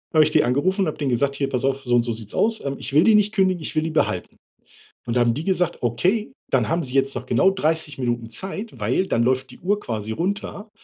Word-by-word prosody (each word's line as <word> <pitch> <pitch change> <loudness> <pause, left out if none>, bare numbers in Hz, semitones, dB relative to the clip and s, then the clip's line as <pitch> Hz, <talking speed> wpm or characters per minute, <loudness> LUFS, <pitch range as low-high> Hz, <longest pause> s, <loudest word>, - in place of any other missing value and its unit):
habe 155 - +7
ich - - 0
die 155 - +4
angerufen 175 - +1
und 190 - +2
habe 155 - -3
denen 140 -3 -1
gesagt: 140 +3 +1
„Hier 140 0 -1
pass 130 -2 -2
auf, 135 0 0
so 125 - -1
und 120 - +5
so 120 0 -3
sieht 110 -2 -6
es - - -8
aus, 220 -5 +1
ähm, 140 0 -2
ich - - -6
will 150 +3 +6
die 220 - +5
nicht 210 0 +3
kündigen, 185 -3 +2
ich 155 - -6
will 155 - +2
die 160 - -2
behalten.“ 155 - -1 0.7
Und 120 0 -1
da - - +4
haben 120 -1 +3
die 150 +6 -4
gesagt: 180 -2 0
„Okay, 185 - 0 0.2
dann 120 -5 +1
haben 170 +4 0
Sie 130 -2 -4
jetzt 135 0 +1
noch - - -5
genau 190 - +3
30 160 -4 -1
Minuten 120 -3 -2
Zeit, 195 - -6
weil 190 - 0
dann 115 - +1
läuft 130 +1 0
die - - -15
Uhr 205 +3 0
quasi 110 - -4
runter. 200 - -3
145 Hz, 270 wpm, -22 LUFS, 125-185 Hz, 0.7 s, habe